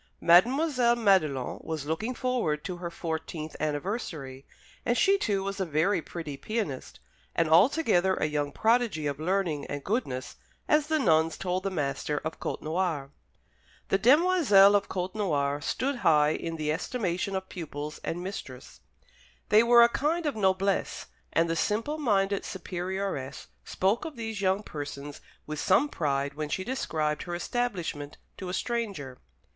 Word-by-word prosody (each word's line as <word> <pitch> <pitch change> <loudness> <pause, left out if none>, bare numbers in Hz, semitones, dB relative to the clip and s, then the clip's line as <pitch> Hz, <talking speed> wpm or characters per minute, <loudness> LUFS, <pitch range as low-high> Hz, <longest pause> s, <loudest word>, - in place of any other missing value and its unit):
Mademoiselle 245 - +4
Madelon 185 - +2
was 160 -3 -4
looking 215 +11 -2
forward 235 -14 -1
to 180 -2 -5
her 175 -1 -5
fourteenth 160 -2 -5
anniversary, 150 - -4 0.4
and 240 0 +1
she, 390 - +5
too, 205 - 0
was 195 +1 -4
a - - +1
very 165 +4 +1
pretty 160 -3 -6
pianist, 185 - -4 0.4
and 165 - +2
altogether 190 - +4
a - - 0
young 145 -1 -1
prodigy 225 -6 +1
of 145 0 -2
learning 170 -3 0
and 145 -1 -5
goodness, 130 - -3 0.3
as 300 -1 +3
the 315 0 +2
nuns 160 - +3
told 185 0 -1
the 195 - -2
master 150 -3 -2
of 160 - -4
Côtenoir. 155 -4 -2 0.8
The 195 - +2
demoiselles 260 - +6
of 205 -1 +2
Côtenoir 180 -7 -1
stood 265 - -1
high 150 -8 +4
in 165 +1 -3
the 155 -1 -1
estimation 185 +1 -2
of 190 0 -3
pupils 150 -3 -6
and 175 +2 -3
mistress; 140 -10 -8 0.7
they 215 +1 +7
were 235 0 +7
a 235 - +6
kind 315 +7 0
of 290 -5 -1
noblesse; 195 -1 0 0.3
and 165 0 +2
the 165 - -1
simple 225 - -1
minded 200 -7 +1
superioress 185 -5 -4
spoke 195 +5 0
of 315 -2 -6
these 225 -3 -5
young 190 +2 +1
persons 145 -3 -7 0.2
with 155 0 -5
some 290 - +3
pride 140 - -1
when 150 +1 -4
she 185 - -2
described 155 - -1
her 175 -1 -4
establishment 175 -9 -3 0.2
to 185 - -6
a - - -4
stranger. 200 - -3
185 Hz, 150 wpm, -28 LUFS, 155-220 Hz, 0.8 s, they